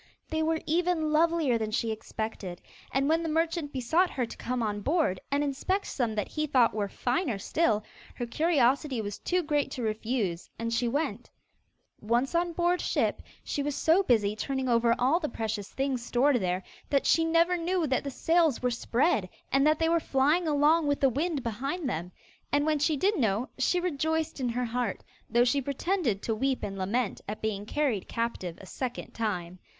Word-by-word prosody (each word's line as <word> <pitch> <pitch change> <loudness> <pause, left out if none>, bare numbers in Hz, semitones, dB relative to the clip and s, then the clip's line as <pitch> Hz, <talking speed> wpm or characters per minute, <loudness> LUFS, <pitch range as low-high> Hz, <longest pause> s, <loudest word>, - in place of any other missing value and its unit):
They 315 0 0
were 320 0 +1
even 330 -1 +1
lovelier 315 -6 +3
than 220 -1 -2
she 225 +1 -1
expected, 220 -4 -5 0.3
and 275 +1 +1
when 325 +2 +3
the 330 - -2
merchant 325 -1 0
besought 315 +8 +2
her 250 - -1
to - - -9
come 250 -1 -2
on 205 -1 -2
board, 290 - +1
and 285 +1 +2
inspect 295 +8 -1
some 235 -5 -2
that 210 - -1
he 305 0 -2
thought 255 -5 +4
were 205 -2 -1
finer 245 - -1
still, 215 - +1 0.3
her 240 - -3
curiosity 275 -1 +2
was 205 -2 -4
too 360 0 0
great 295 -2 0
to 250 - -4
refuse, 215 -5 -2
and 230 0 -2
she 240 +1 +1
went. 245 -3 -2 0.7
Once 240 +6 0
on 345 +1 +1
board 350 +1 +1
ship, - - 0 0.2
she 285 - -2
was 285 0 -2
so 330 +5 +4
busy 215 - +2
turning 265 +3 -2
over 235 -1 +3
all 270 +7 +3
the 305 -4 -2
precious 215 -3 -3
things 265 -3 -1
stored 250 +3 +3
there, 185 -3 -1 0.3
that 280 -2 +2
she 330 - +4
never 335 +2 +3
knew 350 0 0
that 260 -3 0
the 280 - -3
sails 325 0 +2
were 250 0 0
spread, 235 - +1 0.2
and 275 +2 +4
that 310 0 +4
they 325 - +1
were 335 +1 +3
flying 300 +4 +2
along 300 +2 +3
with 285 0 +1
the 270 - +4
wind 290 +2 -1
behind 275 +8 -3
them; 175 -4 -3 0.4
and 290 +1 +2
when 310 -1 +2
she 300 +1 +2
did 395 +5 +1
know, 225 +1 +1
she 355 +7 +2
rejoiced 320 -2 -1
in 250 -2 0
her 245 +1 -1
heart, 245 +1 -2 0.3
though 240 +1 +4
she 275 +3 +2
pretended 280 - -1
to 225 - 0
weep 265 +4 -1
and 195 -1 -3
lament 205 +4 -1
at 210 +1 -4
being 210 -1 -3
carried 265 -10 0
captive 230 -7 -3
a - - -11
second 250 +5 -5
time. 185 -5 -3
265 Hz, 195 wpm, -29 LUFS, 225-315 Hz, 0.7 s, thought